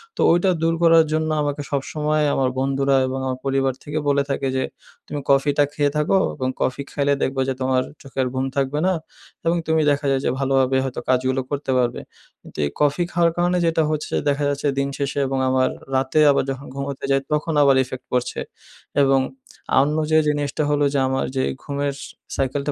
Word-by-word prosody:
তো -, -, -2 dB
ওইটা 175 Hz, +3 st, +3 dB
দূর 165 Hz, 0 st, +2 dB
করার 165 Hz, -1 st, +6 dB
জন্য 155 Hz, 0 st, 0 dB
আমাকে 145 Hz, 0 st, -2 dB
সবসময় 150 Hz, +2 st, 0 dB
আমার 130 Hz, -1 st, +1 dB
বন্ধুরা 135 Hz, +1 st, +1 dB
এবং 130 Hz, +1 st, -3 dB
আমার 130 Hz, -1 st, -2 dB
পরিবার 135 Hz, -1 st, +1 dB
থেকে 150 Hz, +1 st, -4 dB
বলে 140 Hz, 0 st, +3 dB
থাকে 135 Hz, 0 st, -1 dB
যে, 130 Hz, -, +1 dB, 0.4 s
"তুমি 145 Hz, -, -4 dB
কফিটা 140 Hz, +1 st, +3 dB
খেয়ে 145 Hz, -1 st, +1 dB
থাকো 150 Hz, +6 st, +2 dB, 0.2 s
এবং 130 Hz, -3 st, -2 dB
কফি 130 Hz, +2 st, 0 dB
খাইলে 140 Hz, 0 st, +1 dB
দেখবা 135 Hz, 0 st, 0 dB
যে -, -, +1 dB
তোমার 130 Hz, 0 st, +2 dB, 0.2 s
চোখের 135 Hz, -2 st, -2 dB
ঘুম 130 Hz, 0 st, -1 dB
থাকবে 140 Hz, +1 st, 0 dB
না 190 Hz, -, +3 dB, 0.5 s
এবং 165 Hz, +1 st, +2 dB
তুমি 160 Hz, 0 st, +3 dB
দেখা 145 Hz, +1 st, -1 dB
যায় 135 Hz, -1 st, +1 dB
যে -, -, +2 dB
ভালোভাবে 135 Hz, -1 st, +2 dB
হয়তো 130 Hz, -2 st, -4 dB
কাজগুলো 130 Hz, +1 st, +2 dB
করতে 145 Hz, -2 st, -2 dB
পারবে।" 120 Hz, -1 st, 0 dB, 0.4 s
কিন্তু -, -, -15 dB
এই -, -, -1 dB
কফি 150 Hz, +4 st, +2 dB
খাওয়ার 170 Hz, -1 st, +3 dB
কারণে 175 Hz, +1 st, +2 dB
যেটা 165 Hz, -1 st, +2 dB
হচ্ছে 155 Hz, -1 st, -3 dB, 0.2 s
দেখা 145 Hz, +1 st, 0 dB
যাচ্ছে 145 Hz, +1 st, -1 dB
দিন 140 Hz, -, +1 dB
শেষে 140 Hz, 0 st, -2 dB
এবং 135 Hz, 0 st, -2 dB
আমার 130 Hz, 0 st, +2 dB, 0.3 s
রাতে 130 Hz, +3 st, +1 dB
আবার 140 Hz, -, +2 dB
যখন 135 Hz, -, -2 dB, 0.2 s
ঘুমোতে 140 Hz, 0 st, -5 dB
যাই 135 Hz, 0 st, +3 dB
তখন 150 Hz, +2 st, 0 dB
আবার 140 Hz, -1 st, +5 dB
effect 130 Hz, 0 st, -8 dB
পড়ছে 125 Hz, -1 st, -1 dB, 0.6 s
এবং 135 Hz, -1 st, +4 dB, 0.6 s
অন্য 150 Hz, +3 st, +1 dB
যে 155 Hz, -, +5 dB
জিনিসটা 145 Hz, 0 st, 0 dB
হল 145 Hz, 0 st, +1 dB
যে, 140 Hz, -, +2 dB
আমার 130 Hz, 0 st, 0 dB
যে 130 Hz, -, +1 dB, 0.2 s
ঘুমের 140 Hz, 0 st, -2 dB, 0.4 s
সাইকেলটা 140 Hz, +2 st, -1 dB
140 Hz, 190 wpm, -22 LUFS, 135-150 Hz, 0.6 s, করার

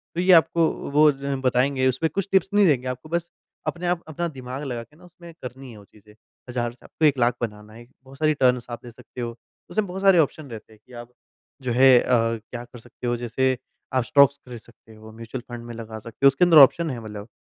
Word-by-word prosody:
तो 175 Hz, -, 0 dB
ये 185 Hz, +1 st, +4 dB
आपको 165 Hz, 0 st, +4 dB, 0.2 s
वो 150 Hz, +1 st, +5 dB
ज 140 Hz, 0 st, -4 dB
बताएँगे 130 Hz, +1 st, +2 dB
उसपे 130 Hz, +6 st, 0 dB
कुछ 195 Hz, +4 st, -3 dB
टिप्स 190 Hz, -1 st, +3 dB
नहीं 205 Hz, 0 st, +5 dB
देंगे 130 Hz, -5 st, +1 dB
आपको 125 Hz, +4 st, -6 dB
बस 170 Hz, 0 st, -2 dB, 0.4 s
अपने 175 Hz, +1 st, -3 dB
आप 175 Hz, -1 st, -1 dB
अपना 170 Hz, +2 st, -3 dB
दिमाग 130 Hz, -2 st, -7 dB
लगा 120 Hz, -4 st, -4 dB
के 135 Hz, +6 st, -24 dB
ना 180 Hz, -, -20 dB
उसमें 175 Hz, -1 st, -14 dB
करनी 130 Hz, 0 st, -9 dB
है 110 Hz, -, -13 dB
वो 105 Hz, -, -14 dB
चीज़े। 105 Hz, 0 st, -21 dB, 0.3 s
हज़ार 120 Hz, -1 st, -2 dB
से 120 Hz, -, -21 dB
आपको 160 Hz, -, -1 dB
1 145 Hz, -2 st, +3 dB
लाख 120 Hz, 0 st, +2 dB
बनाना 105 Hz, -2 st, -6 dB
है। 120 Hz, +1 st, -13 dB, 0.2 s
बहुत 135 Hz, +1 st, -15 dB
सारी 155 Hz, +1 st, +2 dB
टर्न्स 125 Hz, -4 st, +2 dB
आप 120 Hz, -, -6 dB
ले 120 Hz, -, -9 dB
सकते 125 Hz, +1 st, -11 dB
हो, 115 Hz, -1 st, -5 dB, 0.3 s
उसमे 210 Hz, +4 st, 0 dB
बहुत 190 Hz, +2 st, -6 dB
सारे 195 Hz, -2 st, +5 dB
ऑप्शन 150 Hz, -1 st, 0 dB
रहते 110 Hz, 0 st, -10 dB
हैं 110 Hz, -, -21 dB
कि -, -, -17 dB
आप 120 Hz, +1 st, -16 dB, 0.5 s
जो 125 Hz, -2 st, -3 dB
है 130 Hz, 0 st, +6 dB
अ, -, -, -3 dB, 0.5 s
क्या 120 Hz, -1 st, -6 dB
कर 120 Hz, 0 st, -14 dB
सकते 120 Hz, +2 st, -9 dB
हो 120 Hz, -, +1 dB
जैसे 130 Hz, +2 st, 0 dB, 0.4 s
आप 130 Hz, -1 st, +2 dB
स्टॉक्स 140 Hz, +3 st, +4 dB
ख़रीद 120 Hz, -2 st, -8 dB
सकते 110 Hz, 0 st, -19 dB
हो, 110 Hz, 0 st, -13 dB
म्यूच्यूअल 115 Hz, +3 st, -8 dB
फंड 120 Hz, 0 st, -9 dB
में 120 Hz, -, -8 dB
लगा 110 Hz, -1 st, -8 dB
सकते 115 Hz, +5 st, -4 dB
हो, -, -, +11 dB
उसके 135 Hz, +6 st, +4 dB
अंदर 165 Hz, -3 st, +5 dB
ऑप्शन 160 Hz, +4 st, +6 dB
है 125 Hz, -4 st, -5 dB
मतलब 105 Hz, -1 st, -8 dB
130 Hz, 245 wpm, -23 LUFS, 120-155 Hz, 0.5 s, हो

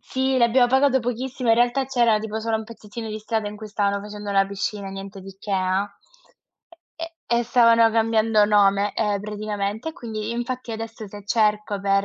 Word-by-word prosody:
sì, 265 Hz, 0 st, -1 dB
l'abbiamo 245 Hz, +1 st, +4 dB
pagato 265 Hz, +1 st, +3 dB
pochissimo, 245 Hz, +1 st, -3 dB
in 225 Hz, -, +5 dB
realtà 245 Hz, +3 st, +2 dB
c'era 240 Hz, -4 st, +3 dB
tipo 220 Hz, 0 st, -4 dB
solo 225 Hz, 0 st, 0 dB
un 220 Hz, -, -4 dB
pezzettino 225 Hz, 0 st, -8 dB
di 215 Hz, 0 st, -4 dB
strada 215 Hz, 0 st, -2 dB
in 210 Hz, -, -8 dB
cui 215 Hz, -, -8 dB
stavano 200 Hz, -1 st, 0 dB
facendo 205 Hz, 0 st, -7 dB
la 195 Hz, 0 st, +3 dB
piscina, 200 Hz, 0 st, -4 dB
niente 195 Hz, +1 st, -8 dB
di 190 Hz, 0 st, -11 dB
che, 205 Hz, -, -8 dB
ah, 185 Hz, +1 st, +1 dB, 1.1 s
e 330 Hz, 0 st, -7 dB
e 235 Hz, -, +2 dB
e -, -, 0 dB
stavano 230 Hz, -2 st, +5 dB
cambiando 225 Hz, -1 st, +3 dB
nome, 205 Hz, -1 st, +3 dB
ehm, 205 Hz, -2 st, 0 dB
praticamente 210 Hz, +3 st, -4 dB
e -, -, -15 dB
quindi 220 Hz, -5 st, -5 dB
infatti 240 Hz, +1 st, -4 dB
adesso 225 Hz, 0 st, -6 dB
se 205 Hz, 0 st, -11 dB
cerco 210 Hz, -2 st, +1 dB
per 195 Hz, 0 st, +2 dB
220 Hz, 190 wpm, -23 LUFS, 205-235 Hz, 1.1 s, in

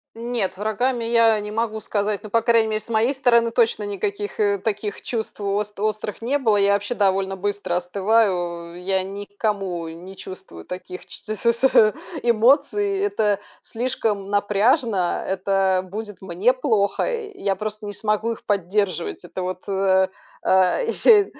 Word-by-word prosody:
Нет, 230 Hz, -5 st, -2 dB
врагами 235 Hz, +4 st, 0 dB
я 230 Hz, -1 st, +4 dB
не 210 Hz, -, -6 dB
могу 220 Hz, 0 st, -1 dB
сказать, 205 Hz, -1 st, -2 dB
но, 215 Hz, -, -8 dB
по 230 Hz, -, +3 dB
крайней 230 Hz, -1 st, +4 dB
мере, 215 Hz, 0 st, 0 dB
с 215 Hz, -, -11 dB
моей 230 Hz, +4 st, +2 dB
стороны 235 Hz, -4 st, +3 dB
точно 225 Hz, -2 st, +2 dB
никаких, 205 Hz, 0 st, -4 dB
э, 205 Hz, -1 st, +2 dB
таких 205 Hz, +1 st, -3 dB
чувств 225 Hz, -3 st, -4 dB
ост 205 Hz, 0 st, -2 dB
острых 215 Hz, 0 st, -2 dB
не 280 Hz, +4 st, +1 dB
было. 220 Hz, -6 st, +3 dB
Я 200 Hz, 0 st, +4 dB
вообще 205 Hz, +4 st, -1 dB
довольно 195 Hz, -2 st, +1 dB
быстро 205 Hz, -2 st, -2 dB
остываю, 180 Hz, -2 st, 0 dB
я 190 Hz, 0 st, +2 dB
ни 200 Hz, +2 st, -6 dB
к 205 Hz, 0 st, -35 dB
кому 195 Hz, -6 st, -1 dB
не 175 Hz, +4 st, -10 dB
чувствую 85 Hz, -, -10 dB
таких 180 Hz, 0 st, -8 dB
ч -, -, -11 dB
ч 215 Hz, 0 st, -4 dB
с -, -, -9 dB
с 235 Hz, -2 st, +4 dB, 0.3 s
эмоций, 280 Hz, -, +3 dB
это 215 Hz, -, +1 dB, 0.2 s
слишком 225 Hz, -5 st, -2 dB
напряжно, 205 Hz, -, +2 dB
это 190 Hz, -1 st, +1 dB
будет 210 Hz, 0 st, -7 dB
мне 190 Hz, +5 st, +2 dB
плохо, 220 Hz, -7 st, +1 dB
и 445 Hz, -5 st, -4 dB
я 195 Hz, -1 st, +2 dB
просто 215 Hz, 0 st, -5 dB
не 205 Hz, -, -5 dB
смогу 215 Hz, +2 st, 0 dB
их 230 Hz, -, -7 dB
поддерживать. 195 Hz, -, -1 dB
Это 185 Hz, -, -6 dB
вот, 185 Hz, +1 st, -5 dB
э, 190 Hz, -1 st, +3 dB, 0.4 s
а 190 Hz, -, +3 dB
я 455 Hz, -3 st, +5 dB
210 Hz, 165 wpm, -22 LUFS, 195-230 Hz, 0.4 s, я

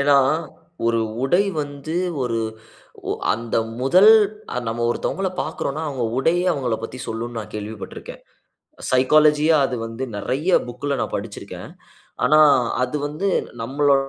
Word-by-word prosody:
ஏன்னா, 140 Hz, 0 st, +5 dB, 0.7 s
ஒரு 115 Hz, 0 st, +2 dB, 0.2 s
உடை 175 Hz, +8 st, +3 dB, 0.2 s
வந்து, 145 Hz, +2 st, -6 dB, 0.3 s
ஒரு 115 Hz, -2 st, -1 dB, 0.7 s
ஒ -, -, +2 dB, 0.2 s
அந்த 115 Hz, 0 st, -3 dB, 0.2 s
முதல் 185 Hz, +11 st, +6 dB, 0.6 s
நம்ம 120 Hz, +1 st, -2 dB
ஒருத்தவங்கள 190 Hz, +9 st, -1 dB
பாக்குறோம்னா, 155 Hz, -1 st, -3 dB
அவங்க 130 Hz, -4 st, -2 dB
உடையே 170 Hz, +6 st, +2 dB
அவங்கள 125 Hz, -7 st, -1 dB
பத்தி 130 Hz, -, -7 dB
சொல்லும்ன்னு 115 Hz, +1 st, -4 dB
நான் 105 Hz, -, -10 dB
கேள்விப்பட்டுருக்கிறேன். 105 Hz, 0 st, -7 dB, 0.7 s
சைக்காலஜியா 150 Hz, +4 st, +4 dB
அது 130 Hz, -, -4 dB
வந்து 115 Hz, +3 st, -7 dB
நெறைய 135 Hz, -, -1 dB, 0.2 s
புக்‌ல 140 Hz, +3 st, -3 dB
நான் -, -, -3 dB
படிச்சிருக்கேன். -, -, -8 dB, 0.6 s
ஆனா 155 Hz, +1 st, +5 dB, 0.4 s
அது 125 Hz, +3 st, -2 dB
வந்து 155 Hz, +7 st, -3 dB, 0.3 s
நம்மளோ 140 Hz, +4 st, +2 dB
135 Hz, 125 wpm, -22 LUFS, 120-155 Hz, 0.7 s, முதல்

